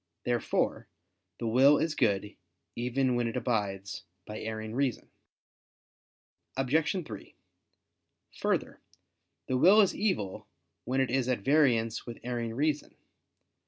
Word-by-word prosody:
Therefore 120 -1 0 0.5
the - - -5
will 130 +6 +6
is 160 -1 0
good, 105 -6 0 0.4
even 125 +2 0
when 120 -1 +1
it 115 - -3
abides 100 -5 -2 0.2
by 105 - -7
erring 110 0 -5
reason. 130 -1 -1 1.5
Obj. 155 +6 +1
3: 105 -6 -10 1.0
Further, - - -1 0.6
the 130 - 0
will 190 +10 +7
is 200 -3 +5
evil 105 - -2 0.4
when 130 +2 +1
it 130 - 0
is 130 -1 +1
at 125 -5 0
variance 120 -5 +2
with 120 - -6
erring 120 -2 -3
reason. 150 +2 -1
125 Hz, 120 wpm, -30 LUFS, 110-135 Hz, 1.5 s, will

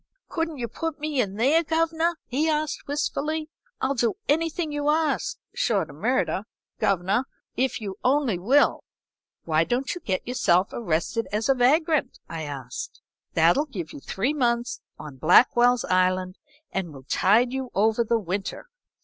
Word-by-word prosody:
"'Couldn't 330 -3 -2
you 240 -2 -3
put 325 +4 -4
me 300 -3 0
in 200 -4 -3
there, 280 +10 +3
governor?' 330 +1 +1
he 295 +6 0
asked, 305 -1 -1
wistfully. 305 +2 -2 0.3
'I'll 265 +1 +1
do 240 +3 +1
anything 325 +1 0
you 290 0 -1
ask, 320 +10 +1 0.2
short - - 0
o' - - -13
murder, - - 0 0.3
governor, 195 +6 +1 0.3
if 260 0 0
you 200 -3 -6
only 255 -8 +2
will.' 260 +11 +3 0.6
"'Why 160 0 +2
don't 250 - -1
you 355 - -8
get 190 -7 -2
yourself 190 -7 +2
arrested 225 +3 -1
as 215 +4 -1
a - - +7
vagrant?' 285 +2 +2
I 165 -1 -5
asked. 135 -5 -6 0.4
'That'll 170 - +4
give 180 - -6
you - - -8
three 225 - -1
months 240 -3 0 0.2
on 150 -3 -9
Blackwell's 245 - +5
Island 185 0 +1 0.3
and 185 -4 -3
will 135 -2 -12
tide 225 - +3
you 265 -1 -3
over 220 +3 +3
the 230 +1 +1
winter.' 195 -1 -4
245 Hz, 155 wpm, -25 LUFS, 190-300 Hz, 0.6 s, a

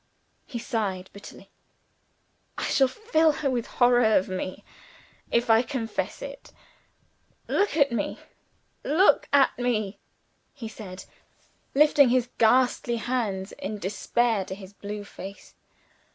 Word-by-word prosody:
He 245 - -5
sighed 200 -5 -3
bitterly. 200 - -13 1.1
"I - - -3
shall 270 - +3
fill 320 - +2
her 280 -2 -1
with 240 -2 -2
horror 245 0 +4
of 185 - +2
me, 185 0 -5 0.7
if 235 +1 +1
I 225 0 +6
confess 250 -4 -4
it. - - -9 1.0
Look 405 -6 +1
at 280 -4 +4
me! 225 -4 -2 0.7
look 345 +7 +3
at 280 -2 +4
me!" 215 -5 -1 0.6
he 245 -6 -7
said, 195 -4 -9 0.7
lifting 290 -2 +6
his 250 0 +2
ghastly 245 +1 +3
hands 215 -6 -2
in 210 +2 -5
despair 210 +2 0
to 190 - -6
his 195 0 -12
blue 205 +1 -6
face. 200 0 -10
235 Hz, 125 wpm, -26 LUFS, 200-260 Hz, 1.1 s, I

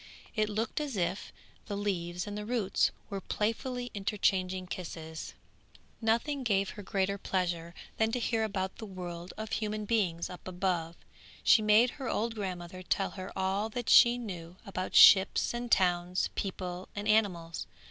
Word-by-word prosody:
It 215 -1 +1
looked 220 +5 -2
as 280 -7 -3
if 180 +2 -2 0.4
the 205 - -3
leaves 180 -3 -2
and 205 - -5
the 210 - -4
roots 215 -3 +1 0.2
were 195 -1 -3
playfully 245 +5 -2
interchanging 190 -2 0
kisses. 160 -3 -7 0.7
Nothing 235 +6 +1
gave 200 -5 +1
her 205 - -9
greater 195 0 -1
pleasure 175 -3 -2 0.2
than 220 0 +2
to 250 - +1
hear 225 -1 0
about 190 -3 -2
the 220 - -7
world 175 -2 -7
of 220 0 -5
human 215 -1 -2
beings 195 -7 0
up 180 - -10
above; 175 -2 -1 0.5
she 220 - +6
made 215 +3 +5
her 260 - -2
old 230 +1 -1
grandmother 185 -3 -5
tell 195 +1 0
her 185 0 -7
all 195 +3 0
that 240 +1 -4
she 240 0 +8
knew 180 -7 -7
about 185 -1 -4
ships 190 +3 +7
and 240 0 -4
towns, 180 -1 +2
people 185 -2 -4
and 205 +1 -4
animals. 185 -7 +1
195 Hz, 160 wpm, -31 LUFS, 180-220 Hz, 0.7 s, she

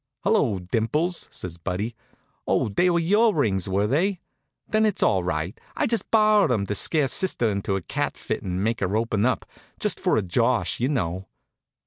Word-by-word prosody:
"Hello, 195 - +2
Dimples!" 115 - -1
says 85 -2 -6
Buddy. 100 +7 -3 0.5
"Oh, - - +1
they 175 - +2
were 170 - +2
your 205 +6 +3
rings, 100 - 0
were 100 +2 +1
they? 175 - +1 0.5
Then 215 0 +2
it's 210 -3 +1
all 95 -2 +2
right. 80 +2 -2 0.2
I - - +1
just 230 -1 -1
borrowed 215 - +4
'em 105 -5 +1
to 105 - -2
scare 145 - +2
sister 130 -4 0
into 100 -1 -1
a 95 - -3
cat - - -3
fit - - -3
and 95 0 -3
make 115 +1 0
her 100 +2 0
open 110 -1 +1
up 130 - -1 0.3
just - - -1
for - - +2
a 105 - +1
josh, 115 +6 +1
you 125 +3 +1
know." 95 - -2
115 Hz, 185 wpm, -24 LUFS, -, 0.5 s, borrowed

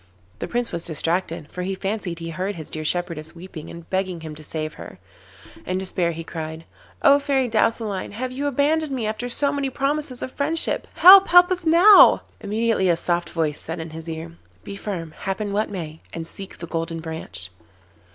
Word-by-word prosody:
The - - -4
Prince 240 -1 -2
was 170 -1 -1
distracted, 165 0 -1
for 180 - -5
he 190 +1 -2
fancied 195 -3 -3
he 165 0 -6
heard 185 +5 -3
his 160 -3 -9
dear 155 - -4
shepherdess 165 -1 -2
weeping 170 -2 -9
and 170 -1 -10
begging 185 -3 -1
him 160 -1 -7
to 155 +1 -10
save 155 0 -4
her. - - -11 0.7
In 185 - -2
despair 180 -2 -1
he 165 0 -6
cried: 160 0 -7 0.4
'Oh, 285 -2 +7
Fairy 275 -3 +1
Douceline, 220 -3 0
have 250 +4 -4
you 280 +3 -2
abandoned 290 +2 +1
me 250 -4 -2
after 220 +3 -3
so 280 +3 +1
many 280 -1 -1
promises 275 -1 -2
of 255 - -5
friendship? 310 +4 0
Help, 385 +2 +9
help 355 +1 +7
us 360 -2 -1
now!' 360 +6 +8 0.2
Immediately 215 -2 0
a 170 - +3
soft 170 0 -1
voice 155 -3 -1
said 165 +2 -5
in 160 0 -6
his 160 +1 -8
ear: 165 +1 -6 0.3
'Be 200 - -7
firm, 180 -6 -5
happen 200 +4 -4
what 210 +2 0
may, 160 -5 -6
and 165 -1 -5
seek 195 +3 -5
the 170 - -7
Golden 165 0 -3
Branch. 160 - -5
185 Hz, 190 wpm, -23 LUFS, 165-250 Hz, 0.7 s, Help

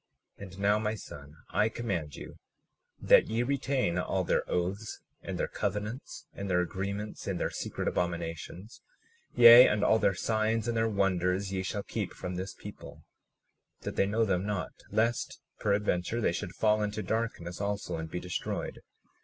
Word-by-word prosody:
37:27 - - -8
And 95 +1 -12
now, 105 +1 +3
my 110 0 -1
son, 75 -7 -11 0.2
I 105 +1 +3
command 90 -11 -3
you - - -10 0.6
that - - +6
ye 115 +2 0
retain 135 -8 0
all 95 +1 0
their - - +1
oaths, 95 +5 -2 0.2
and - - -5
their - - 0
covenants, 105 +5 -4
and 100 0 -5
their 90 -1 +3
agreements 100 +4 -3
in 95 -2 -1
their - - -1
secret - - -4
abominations; 85 +4 -3 0.5
yea, 120 +1 +10
and 105 0 +1
all 110 - +4
their 100 - +2
signs 110 +2 0
and 120 - 0
their 115 0 +2
wonders 95 -1 +1
ye 95 - 0
shall 100 +2 -3
keep - - -4
from 90 - -5
this 95 +2 -5
people, - - -11 0.8
that - - -5
they 95 - +2
know 110 +3 +2
them 95 -3 +1
not, 100 -3 -2 0.2
lest 110 +3 0 0.2
peradventure 100 0 0
they 100 - +1
should 85 +1 -5
fall 110 -1 +3
into 105 0 -2
darkness 105 -6 -3
also 100 -3 -2
and 80 0 -5
be 90 - -3
destroyed. 90 -1 -4
100 Hz, 170 wpm, -30 LUFS, 90-110 Hz, 0.8 s, yea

